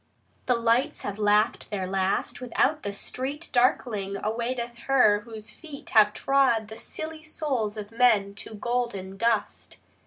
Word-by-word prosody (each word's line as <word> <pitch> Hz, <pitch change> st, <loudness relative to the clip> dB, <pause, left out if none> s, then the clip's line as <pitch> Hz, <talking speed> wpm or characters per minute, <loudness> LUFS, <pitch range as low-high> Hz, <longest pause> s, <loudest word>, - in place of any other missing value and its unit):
The 250 Hz, -, +4 dB
lights 235 Hz, +6 st, +1 dB
have 205 Hz, +1 st, -5 dB
laughed 210 Hz, +2 st, +2 dB
their 195 Hz, -3 st, -2 dB
last; 190 Hz, +5 st, -1 dB
without, 270 Hz, +5 st, +1 dB
the 200 Hz, -, -3 dB
street 270 Hz, +9 st, -5 dB
Darkling, 225 Hz, -5 st, +1 dB
awaiteth 235 Hz, +2 st, -3 dB
her 250 Hz, -7 st, +5 dB
whose 220 Hz, -1 st, -9 dB
feet 290 Hz, +3 st, -11 dB
have 215 Hz, -4 st, +6 dB
trod 240 Hz, -3 st, +2 dB
The 220 Hz, -, -9 dB
silly 315 Hz, 0 st, -6 dB
souls 265 Hz, -9 st, -2 dB
of 210 Hz, 0 st, -7 dB
men 225 Hz, -4 st, +3 dB
to 215 Hz, +2 st, -8 dB
golden 220 Hz, -5 st, -2 dB
dust. 225 Hz, +1 st, -1 dB
230 Hz, 145 wpm, -26 LUFS, 210-255 Hz, -, have